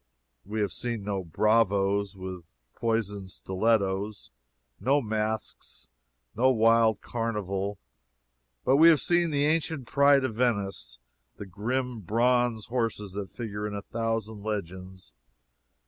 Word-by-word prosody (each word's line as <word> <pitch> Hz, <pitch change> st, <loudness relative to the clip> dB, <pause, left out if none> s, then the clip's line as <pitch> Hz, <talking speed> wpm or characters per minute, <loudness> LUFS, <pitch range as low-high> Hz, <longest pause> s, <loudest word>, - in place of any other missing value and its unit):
We 105 Hz, +2 st, -3 dB
have 100 Hz, -, 0 dB
seen 115 Hz, -4 st, -3 dB
no 100 Hz, -2 st, -2 dB
bravoes 100 Hz, +1 st, +1 dB
with 95 Hz, -2 st, -7 dB, 0.3 s
poisoned 105 Hz, -4 st, -2 dB
stilettos, 95 Hz, -, -1 dB, 0.5 s
no 135 Hz, +8 st, +3 dB
masks, 110 Hz, -2 st, -4 dB, 0.5 s
no 130 Hz, +4 st, +4 dB
wild 115 Hz, -2 st, +4 dB
carnival; 105 Hz, -4 st, -3 dB, 0.9 s
but 135 Hz, -, +4 dB
we 165 Hz, +3 st, +8 dB
have 160 Hz, -3 st, +5 dB
seen 175 Hz, -1 st, +2 dB
the 145 Hz, -1 st, +1 dB
ancient 155 Hz, -3 st, 0 dB
pride 140 Hz, +1 st, +4 dB
of 130 Hz, -4 st, -1 dB
Venice, 100 Hz, -, -1 dB, 0.4 s
the 105 Hz, -, -7 dB
grim 120 Hz, +6 st, -3 dB
Bronze 120 Hz, +2 st, +1 dB
Horses 115 Hz, -4 st, -2 dB
that 100 Hz, 0 st, -5 dB
figure 105 Hz, -3 st, -5 dB
in 105 Hz, -, -5 dB
a 100 Hz, -, -5 dB
thousand 115 Hz, -2 st, -3 dB
legends. 95 Hz, -, -6 dB
110 Hz, 120 wpm, -28 LUFS, 100-120 Hz, 0.9 s, we